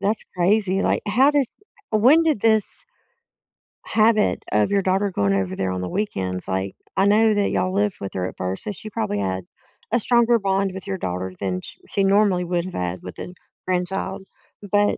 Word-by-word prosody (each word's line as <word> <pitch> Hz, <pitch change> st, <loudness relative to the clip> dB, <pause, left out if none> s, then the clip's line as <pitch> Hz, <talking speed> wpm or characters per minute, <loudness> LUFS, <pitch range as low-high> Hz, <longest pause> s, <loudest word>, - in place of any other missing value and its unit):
That's 210 Hz, +2 st, 0 dB
crazy. 195 Hz, +1 st, +2 dB
Like, -, -, +1 dB
how 255 Hz, +7 st, +4 dB
does 285 Hz, -4 st, +1 dB, 0.4 s
when 260 Hz, +10 st, +5 dB
did 305 Hz, -9 st, +1 dB
this 220 Hz, -2 st, +2 dB, 1.0 s
habit 215 Hz, -1 st, +2 dB
of 105 Hz, -, +2 dB
your 200 Hz, -1 st, +1 dB
daughter 195 Hz, +2 st, +1 dB
going 100 Hz, -, +1 dB
over 95 Hz, -1 st, -1 dB
there 95 Hz, -1 st, -1 dB
on 90 Hz, 0 st, -3 dB
the 90 Hz, -, -4 dB
weekends? 95 Hz, -, -3 dB
Like, 95 Hz, 0 st, -2 dB, 0.2 s
I 195 Hz, -, +3 dB
know 215 Hz, +2 st, +4 dB
that 205 Hz, -1 st, +1 dB
y'all 185 Hz, 0 st, 0 dB
lived 205 Hz, -1 st, +1 dB
with 100 Hz, -, -6 dB
her 90 Hz, -1 st, -2 dB
at -, -, -9 dB
first, 90 Hz, +1 st, -3 dB
so 210 Hz, -, -3 dB
she 215 Hz, +3 st, -7 dB
probably 215 Hz, -, -2 dB
had 95 Hz, -2 st, -2 dB, 0.5 s
a 240 Hz, -, +3 dB
stronger 235 Hz, +1 st, +3 dB
bond 195 Hz, -1 st, 0 dB
with 190 Hz, 0 st, -8 dB
your 195 Hz, -1 st, -3 dB
daughter 90 Hz, -, -4 dB
than 90 Hz, -2 st, -2 dB
sh -, -, -9 dB
she 200 Hz, -, 0 dB
normally 195 Hz, -2 st, +3 dB
would've 175 Hz, +1 st, -2 dB
had 90 Hz, 0 st, -3 dB
with 90 Hz, -, -9 dB
a 180 Hz, -, -7 dB, 0.3 s
grandchild. 185 Hz, +1 st, -2 dB, 0.5 s
But, 205 Hz, 0 st, +3 dB
195 Hz, 190 wpm, -22 LUFS, -, 1.0 s, when